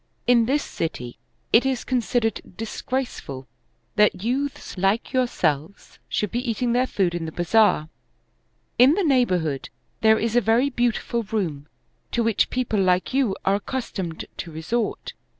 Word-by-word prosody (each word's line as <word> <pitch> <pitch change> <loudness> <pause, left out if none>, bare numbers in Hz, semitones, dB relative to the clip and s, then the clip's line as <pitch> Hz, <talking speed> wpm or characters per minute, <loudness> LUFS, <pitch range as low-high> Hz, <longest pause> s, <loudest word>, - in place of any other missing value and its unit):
In 235 -2 +4
this 290 +3 +1
city 125 -7 -5 0.3
it 230 - +7
is 265 -2 -1
considered 240 -2 0 0.2
disgraceful 225 - -4 0.5
that 210 -3 +3
youths 270 +4 -2
like 195 +4 0
yourselves 180 - -1
should 210 - -1
be 240 - -1
eating 235 +2 0
their 250 +1 +2
food 185 -7 0
in 170 -1 -3
the - - -5
bazaar; 175 -1 +3 0.9
in 265 +5 +7
the 400 - +1
neighborhood 185 - +1 0.3
there 220 0 +5
is 230 +1 -1
a 245 - +5
very 240 +5 +2
beautiful 240 -1 0
room, 185 -10 -3 0.5
to 235 - +2
which 225 -2 +2
people 250 -4 -1
like 185 +4 +2
you 260 -8 +2
are 195 - +3
accustomed 200 -6 -4
to 165 - -6
resort. 190 +9 -3
225 Hz, 145 wpm, -24 LUFS, 180-245 Hz, 0.9 s, it